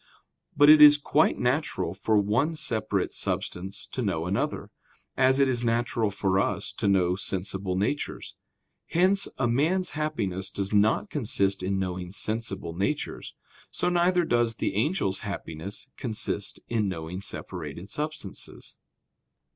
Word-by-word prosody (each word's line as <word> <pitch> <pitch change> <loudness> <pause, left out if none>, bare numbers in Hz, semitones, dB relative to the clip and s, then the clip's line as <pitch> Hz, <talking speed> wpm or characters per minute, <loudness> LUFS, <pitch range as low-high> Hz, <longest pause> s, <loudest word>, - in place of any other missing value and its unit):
But 145 0 +7
it 155 0 +9
is 145 0 +10
quite 145 +2 +2
natural 130 +1 -1
for 105 +3 +1
one 115 +11 +1
separate 120 -8 -1
substance 95 +3 -3
to 130 - -3
know 95 -7 -1
another; 95 +3 -2 0.4
as 130 0 +4
it 140 - +5
is 120 -2 -1
natural 115 -1 +1
for 95 -1 0
us - - -1
to - - -2
know 90 -2 +3
sensible 95 -1 -2
natures. 105 +10 -2 0.5
Hence, 190 +3 +3
as 125 - +1
man's 165 +9 +1
happiness 105 -12 -2
does 100 +1 -3
not 110 - +2
consist 100 -8 0
in 95 +1 -1
knowing 90 -1 -3
sensible 110 -4 -2
natures; 100 - -3 0.3
so 180 - -1
neither 175 0 +3
does 120 -4 +1
the - - -2
angel's 105 - 0
happiness 100 +5 -6
consist 110 -4 -3
in 110 -3 0
knowing 85 +1 -5
separated 85 -3 -6
substances. 150 -5 -5
110 Hz, 135 wpm, -27 LUFS, 95-145 Hz, 0.5 s, is